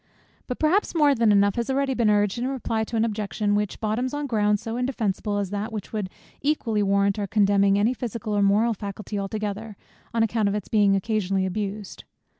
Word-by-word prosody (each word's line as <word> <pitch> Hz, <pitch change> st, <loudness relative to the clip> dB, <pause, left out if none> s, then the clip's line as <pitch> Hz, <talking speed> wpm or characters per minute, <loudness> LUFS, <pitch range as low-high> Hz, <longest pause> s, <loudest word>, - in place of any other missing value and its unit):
But 250 Hz, -, -3 dB
perhaps 350 Hz, +5 st, +1 dB
more 295 Hz, -3 st, +5 dB
than 230 Hz, -4 st, +3 dB
enough 200 Hz, 0 st, +4 dB
has 235 Hz, -1 st, -1 dB
been 265 Hz, -, 0 dB
already 275 Hz, -1 st, 0 dB
urged 205 Hz, +1 st, +2 dB
in 245 Hz, -, -1 dB
reply 230 Hz, -4 st, -2 dB
to 230 Hz, -, -6 dB
an 225 Hz, 0 st, +2 dB
objection, 210 Hz, -1 st, -1 dB
which 205 Hz, -1 st, -1 dB
bottoms 235 Hz, +5 st, -1 dB
on 290 Hz, 0 st, -2 dB
ground 210 Hz, -5 st, +1 dB
so 225 Hz, +2 st, -5 dB
indefensible, 225 Hz, -5 st, -1 dB
as 200 Hz, -2 st, -2 dB
that 205 Hz, +2 st, -3 dB
which 215 Hz, -1 st, -6 dB
would 210 Hz, -4 st, -2 dB, 0.3 s
equally 250 Hz, -7 st, 0 dB
warrant 200 Hz, 0 st, +2 dB
our 200 Hz, -, -2 dB
condemning 200 Hz, -1 st, +3 dB
any 215 Hz, +5 st, +2 dB
physical 230 Hz, -3 st, -4 dB
or 205 Hz, -, +2 dB
moral 210 Hz, +4 st, +3 dB
faculty 205 Hz, 0 st, -5 dB
altogether, 210 Hz, +1 st, -4 dB, 0.3 s
on 230 Hz, -1 st, +2 dB
account 220 Hz, -2 st, +1 dB
of 200 Hz, -, -1 dB
its 210 Hz, -, -5 dB
being 205 Hz, -2 st, +4 dB
occasionally 195 Hz, -2 st, 0 dB
abused. 200 Hz, +1 st, -5 dB
210 Hz, 200 wpm, -24 LUFS, 200-230 Hz, 0.3 s, more